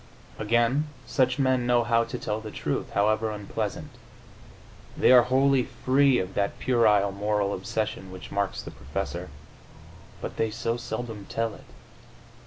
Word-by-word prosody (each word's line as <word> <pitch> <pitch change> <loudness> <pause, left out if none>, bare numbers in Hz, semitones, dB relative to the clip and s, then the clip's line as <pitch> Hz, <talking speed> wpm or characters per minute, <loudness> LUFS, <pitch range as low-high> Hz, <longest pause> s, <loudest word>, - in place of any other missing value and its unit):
Again, 120 +7 +2 0.2
such 130 0 +1
men 130 -3 +2
know 120 -1 +4
how 115 0 +3
to 115 - -5
tell 105 +1 -3
the 110 - -7
truth, - - -3
however 110 +2 +2
unpleasant; 105 -2 -4 1.1
they - - +5
are 125 -1 +9
wholly 130 +2 +3
free 130 +2 +2
of 95 -2 -3
that 100 -1 -1
puerile 105 -5 +3
moral 100 0 0
obsession 100 +1 -3
which 95 -1 -10
marks 100 -1 -1
the - - -8
professor.... - - -5 0.9
But - - -6
they 110 - +1
so 115 +1 -2
seldom 110 -3 -5
tell 115 -1 -1
it! - - -14
115 Hz, 145 wpm, -26 LUFS, 105-125 Hz, 1.1 s, are